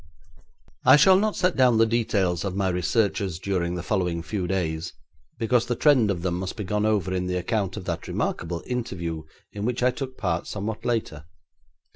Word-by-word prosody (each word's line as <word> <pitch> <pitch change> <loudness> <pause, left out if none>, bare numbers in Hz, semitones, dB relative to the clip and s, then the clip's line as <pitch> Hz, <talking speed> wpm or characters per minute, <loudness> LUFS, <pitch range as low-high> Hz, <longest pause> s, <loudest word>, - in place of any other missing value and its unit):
I - - +8
shall 185 +6 +7
not 215 +1 0
set 180 -1 +1
down 125 -3 +4
the 115 - +5
details 100 -6 0
of 95 -2 -3
my 95 -1 +1
researches 95 0 0
during 90 -2 -1
the 90 - -4
following 90 -5 -1
few 90 +1 -3
days, 85 -4 -2 0.4
because 120 0 +1
the 120 - 0
trend 130 -8 +4
of 90 -4 -2
them 90 -1 -1
must 95 0 -5
be 105 - -3
gone 105 +2 0
over 100 -4 0
in 90 0 -1
the 90 0 -1
account 95 +1 -1
of 100 - -7
that 85 -1 -4
remarkable 85 0 -2
interview 85 -10 -4 0.3
in 100 - -5
which 125 +2 -1
I 125 - +4
took 130 0 -6
part 85 -4 -1
somewhat 105 +2 -4
later. 105 -11 -2
100 Hz, 190 wpm, -25 LUFS, 90-115 Hz, 0.4 s, I